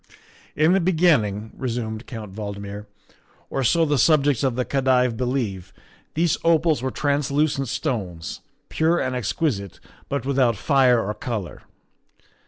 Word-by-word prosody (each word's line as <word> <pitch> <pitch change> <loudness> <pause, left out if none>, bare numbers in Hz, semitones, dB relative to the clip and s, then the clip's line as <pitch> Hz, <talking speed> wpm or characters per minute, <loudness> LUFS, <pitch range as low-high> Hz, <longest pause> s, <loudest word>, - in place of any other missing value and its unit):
" - - -28
In 165 +3 +5
the 195 - +4
beginning," 150 - +2
resumed 115 -3 -4
Count 110 -6 -8
Valdmir, 100 0 -6 0.3
" - - -34
or 135 - -1
so 165 +7 +3
the 145 -3 +1
subjects 145 -2 +3
of 130 -3 +1
the 125 0 -1
Khedive 130 -3 +2
believe, 110 -7 -2 0.4
these 165 +1 +1
opals 165 -3 +3
were 130 - -1
translucent 140 0 0
stones, 105 - -3 0.3
pure 165 +2 +1
and 130 0 -1
exquisite, 120 - -2 0.3
but 140 -2 -2
without 130 -5 +2
fire 130 -6 +3
or 105 - -1
color. 105 - -5
130 Hz, 140 wpm, -23 LUFS, 110-145 Hz, 0.4 s, In